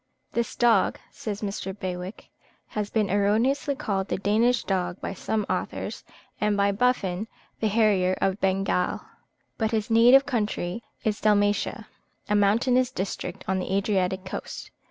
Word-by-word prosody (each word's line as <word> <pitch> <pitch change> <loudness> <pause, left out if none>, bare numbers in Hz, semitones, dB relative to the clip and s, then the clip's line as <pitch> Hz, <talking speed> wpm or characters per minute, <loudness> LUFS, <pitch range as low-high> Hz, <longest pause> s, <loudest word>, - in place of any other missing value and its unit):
This 235 -1 -2
dog, 230 -5 +3
says 210 -1 -5
Mr. 195 -1 -4
Bewick, 185 +1 -6 0.4
has 210 -1 -3
been 215 -4 0
erroneously 225 +8 +2
called 195 -6 -2
the - - -1
Danish 225 +5 +2
dog 180 -2 -1
by - - -4
some 210 +2 -2
authors, - - -3 0.4
and 210 -1 +1
by 200 0 +3
Buffon 205 -3 0 0.3
the 220 - +1
harrier 200 -4 +3
of 195 +1 0
Bengal; 190 -1 +1 0.6
but 220 -1 +1
his 220 0 -1
native 245 +4 +7
country 210 -5 -2 0.2
is 210 -1 -1
Dalmatia, 205 -1 +2 0.4
a 210 - 0
mountainous 240 +5 +3
district 190 -4 -5
on 190 0 +1
the 185 - -4
Adriatic 190 -2 0
coast. 190 - -6
205 Hz, 140 wpm, -26 LUFS, 190-225 Hz, 0.6 s, native